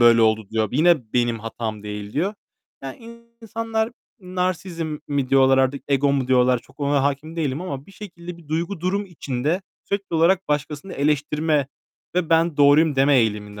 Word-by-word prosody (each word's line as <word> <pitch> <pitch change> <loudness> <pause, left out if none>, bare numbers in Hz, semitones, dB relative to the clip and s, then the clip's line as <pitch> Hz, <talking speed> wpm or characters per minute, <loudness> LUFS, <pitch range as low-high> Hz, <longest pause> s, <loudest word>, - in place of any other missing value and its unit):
böyle 115 -1 +6
oldu." 110 -2 +2
diyor. 110 -1 0
Yine 150 -5 +3
"Benim 120 -2 +1
hatam 110 -1 -5
değil." 105 0 -6
diyor. 190 +8 -1 0.5
Yani 230 - -10 0.2
insanlar 225 0 -2 0.3
"narsisizm" 180 -4 -3
mi 140 -3 -1
diyorlar 135 -1 +5
artık 135 +1 +1
"ego" 140 0 +3
mu 130 -2 0
diyorlar 125 -1 +4
çok 135 - -21
ona 140 -1 +2
hâkim 145 +4 -2
değilim 150 -2 -1
ama 140 -7 -5
bir 195 - -15
şekilde 175 -4 -9
bir 165 -3 -17
duygu 170 +3 -2
durum 195 +3 -1
içinde 155 +1 -2 0.2
sürekli 200 -3 -3
olarak 180 +2 +3
başkasını 150 +4 -2
eleştirme 150 0 +1 0.5
ve 175 -2 0
"ben 165 -1 +3
doğruyum" 145 +1 +5
deme 135 +1 +5
eğiliminde 105 -3 0
145 Hz, 165 wpm, -22 LUFS, 130-175 Hz, 0.5 s, böyle